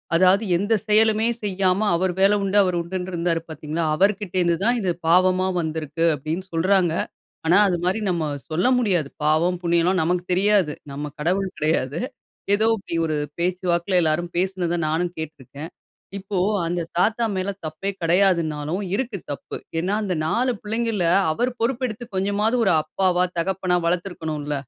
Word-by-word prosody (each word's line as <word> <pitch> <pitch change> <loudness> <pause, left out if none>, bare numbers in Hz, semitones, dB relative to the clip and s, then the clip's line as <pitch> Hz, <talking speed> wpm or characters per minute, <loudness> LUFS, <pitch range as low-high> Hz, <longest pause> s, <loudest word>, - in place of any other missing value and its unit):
அதாவது 185 +5 +4
எந்த 205 +5 0
செயலுமே 220 +1 +4 0.2
செய்யாம 195 +1 +1
அவர் 185 +2 +1
வேலை 195 +2 +5
உண்டு 195 +1 +1
அவர் 180 -2 0
உண்டுன்னு 180 +2 -5
இருந்தாரு 170 -1 0
பாத்தீங்களா? 155 +2 -4
அவர்கிட்ட 195 +1 0
இருந்து 170 -1 +2
தான் 240 +2 +3
இது 185 - -1 0.2
பாவமா 185 +2 +4
வந்திருக்கு. 160 0 -3
அப்டின்னு 155 +6 -4
சொல்றாங்க. 180 0 +2 0.5
ஆனா 175 +4 +5
அது 180 -2 0
மாரி 190 +5 +1
நம்ம 170 -3 0 0.2
சொல்ல 170 +8 +1
முடியாது. 185 - +1 0.2
பாவம், 165 +4 +2
புண்ணியம்லாம் 170 +2 +2
நமக்கு 175 +2 0
தெரியாது. 190 -4 +3 0.2
நம்ம 145 +1 -5
கடவுள் 185 +4 0
கிடையாது. 155 -2 0 0.6
ஏதோ 215 +2 +1
இப்டி 195 -4 -6
ஒரு 155 -1 -1 0.2
பேச்சுவாக்குல 180 +1 +1
எல்லாரும் 165 +2 -1
பேசினத 180 -2 0
நானும் 170 +3 -1
கேட்ருக்கேன். 150 +1 -8 0.5
இப்போ 195 0 -4 0.3
அந்த 175 +1 -1 0.2
தாத்தா 220 +5 +2
மேல 185 +1 -1
தப்பே 160 +6 -3
கிடையாதுன்னாலும், 170 -2 +1
இருக்கு 230 -3 -2
தப்பு. 140 - -7 0.2
ஏன்னா 185 +5 0
அந்த 190 -3 -1
4 245 +9 +1
பிள்ளைங்கள்ல 220 -4 -1 0.3
அவர் 245 +10 0
பொறுப்பு 255 +2 0
எடுத்து 225 +2 -7
கொஞ்சமாவது 205 +5 +1
ஒரு 195 - +3
அப்பாவா, 180 +2 +1
தகப்பனா 185 0 0
வளத்திருக்கணுல்ல? 160 -4 -2
180 Hz, 145 wpm, -23 LUFS, 165-200 Hz, 0.6 s, வேலை